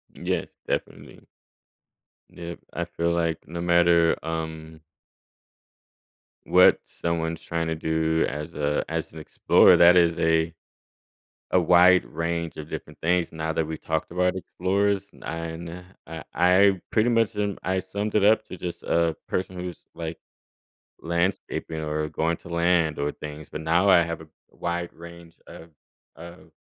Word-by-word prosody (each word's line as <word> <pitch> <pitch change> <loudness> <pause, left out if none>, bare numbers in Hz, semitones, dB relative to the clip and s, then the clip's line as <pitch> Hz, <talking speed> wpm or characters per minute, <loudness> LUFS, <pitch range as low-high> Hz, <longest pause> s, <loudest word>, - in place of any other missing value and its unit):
Yes, - - -3
definitely. - - -5 1.0
Yep. 85 0 -8
I 85 - -2
feel 85 0 -2
like 85 -1 -1
no 85 +1 -5
matter, 85 -1 +4
um 80 -1 -5 1.7
what - - +6
someone's 80 -1 -3
trying 85 -1 -2
to 80 - -1
do 80 0 0
as 75 +1 -6
a 75 0 -1
as - - -3
an 80 - -8
explorer, 75 - +5
that 90 +1 +7
is 85 -1 +3
a 80 0 +2 1.0
a - - +4
wide 90 +1 +6
range 85 +1 -3
of 75 0 -8
different - - -8
things 85 0 +1
now 80 0 -3
that 80 0 0
we've 80 0 -6
talked 80 +1 -2
about 90 +1 +1
explorers 100 +2 -1
n - - -16
and 85 +2 -6 0.2
I 80 0 -8
I 95 +1 +4
pretty 110 +2 +3
much 115 -2 +2
and 100 -1 -1
I 95 0 0
summed 100 +3 -4
it 105 - +3
up 110 +1 +4
to 90 - -7
just 85 0 -6
a 85 -1 +1
person 95 0 -2
who's, 90 -1 -6 0.2
like, 80 0 -6 0.8
landscaping 85 -1 -2
or 75 0 -2
going 80 +2 -1
to - - -13
land 85 -2 +1
or 70 0 -1
things. 75 0 -9
But - - -6
now 85 +5 +2
I 90 -3 +7
have 85 0 -4
a 80 - -11 0.2
wide 85 0 -4
range 85 0 -13
of 80 +1 -12 0.5
of 85 +3 -12
85 Hz, 150 wpm, -25 LUFS, 80-90 Hz, 1.7 s, that